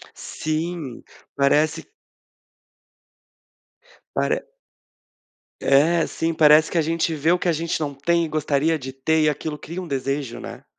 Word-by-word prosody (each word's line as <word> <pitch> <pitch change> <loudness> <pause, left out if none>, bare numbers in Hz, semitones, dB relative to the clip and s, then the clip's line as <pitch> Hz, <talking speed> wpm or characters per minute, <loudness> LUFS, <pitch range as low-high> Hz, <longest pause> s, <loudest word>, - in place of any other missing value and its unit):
Sim, 155 -4 -4 0.3
parece 150 +3 +2 2.2
Pare - - 0 1.1
É, 160 +5 +3
sim, 165 0 -2
parece 155 0 +6
que 170 - 0
a - - +3
gente 165 +1 0
vê 155 +2 +1
o 180 - +4
que 175 - -2
a - - +4
gente 165 +1 -2
não 145 -2 -3
tem 170 +4 +1
e - - -4
gostaria 155 +1 0
de 130 -1 -7
ter 155 +4 +1
e 155 - +4
aquilo 150 +1 -3
cria 170 +5 -7
um - - -7
desejo, 135 -3 -3
né? - - -9
155 Hz, 145 wpm, -22 LUFS, 140-165 Hz, 2.2 s, parece